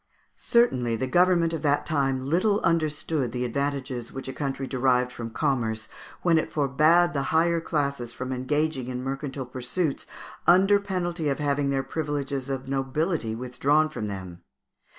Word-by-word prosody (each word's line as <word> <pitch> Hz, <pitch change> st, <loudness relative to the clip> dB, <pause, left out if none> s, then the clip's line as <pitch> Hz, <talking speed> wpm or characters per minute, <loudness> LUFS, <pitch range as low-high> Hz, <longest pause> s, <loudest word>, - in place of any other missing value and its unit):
Certainly 125 Hz, -, +2 dB
the 130 Hz, -, -1 dB
government 175 Hz, +3 st, +3 dB
of 160 Hz, -, -3 dB
that 145 Hz, -1 st, +1 dB
time 135 Hz, -4 st, 0 dB
little 190 Hz, +8 st, +2 dB
understood 155 Hz, -5 st, 0 dB
the 125 Hz, +1 st, -2 dB
advantages 130 Hz, -1 st, -3 dB
which 135 Hz, 0 st, -7 dB
a 130 Hz, -, -4 dB
country 135 Hz, -2 st, -3 dB
derived 125 Hz, -1 st, +1 dB
from 115 Hz, -2 st, -6 dB
commerce 110 Hz, -5 st, -1 dB, 0.4 s
when 165 Hz, -2 st, +4 dB
it -, -, -4 dB
forbade 155 Hz, +5 st, +3 dB
the 140 Hz, -2 st, -1 dB
higher 165 Hz, +1 st, +2 dB
classes 140 Hz, -7 st, -2 dB
from 130 Hz, +2 st, -4 dB
engaging 135 Hz, +1 st, -1 dB
in 125 Hz, 0 st, -4 dB
mercantile 135 Hz, 0 st, -4 dB
pursuits 130 Hz, +5 st, -3 dB, 0.4 s
under 195 Hz, +3 st, +6 dB
penalty 175 Hz, -5 st, -2 dB
of 135 Hz, -, 0 dB
having 145 Hz, -1 st, 0 dB
their 135 Hz, -1 st, 0 dB
privileges 140 Hz, -3 st, -3 dB
of 135 Hz, -1 st, -3 dB
nobility 135 Hz, -1 st, -1 dB
withdrawn 140 Hz, +6 st, +1 dB
from 110 Hz, -8 st, -4 dB
them. 95 Hz, -3 st, -7 dB
140 Hz, 150 wpm, -26 LUFS, 130-160 Hz, 0.4 s, under